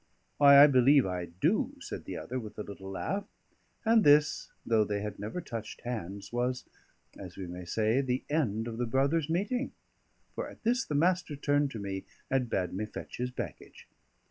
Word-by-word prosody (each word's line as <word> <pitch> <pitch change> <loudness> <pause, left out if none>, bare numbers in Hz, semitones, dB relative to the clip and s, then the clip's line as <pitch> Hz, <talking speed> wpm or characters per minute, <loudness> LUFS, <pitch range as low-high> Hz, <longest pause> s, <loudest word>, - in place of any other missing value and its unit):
"Why, 140 -1 +9
I - - +11
believe 135 0 +5
I 90 -2 -2
do," 85 +2 0
said - - -7
the - - -5
other, 130 +1 -4
with 110 -3 -9
a 105 - -3
little 95 -2 -9
laugh. 195 - -3 0.6
And 225 -1 +5
this, 150 +1 +4
though 110 -2 +3
they 105 -1 -2
had 105 -1 -5
never 110 - -4
touched 115 -9 -7
hands, 100 -4 -5
was 125 +1 -1 0.5
(as 90 -3 -9
we 95 - -5
may 90 0 -7
say) 110 +8 +1
the 130 -1 -1
end 115 -8 0
of 115 0 -5
the 120 - 0
brothers' 140 +5 +1
meeting; 205 +10 -1 0.6
for - - -4
at - - -15
this 245 +3 +2
the 150 - -3
Master 175 0 +2
turned 145 0 +1
to 115 - -7
me 95 -1 -4 0.3
and 130 -3 +1
bade 90 -5 -1
me 105 +3 -3
fetch - - -8
his 125 +1 -2
baggage. 125 - -8
125 Hz, 190 wpm, -30 LUFS, 100-145 Hz, 0.6 s, I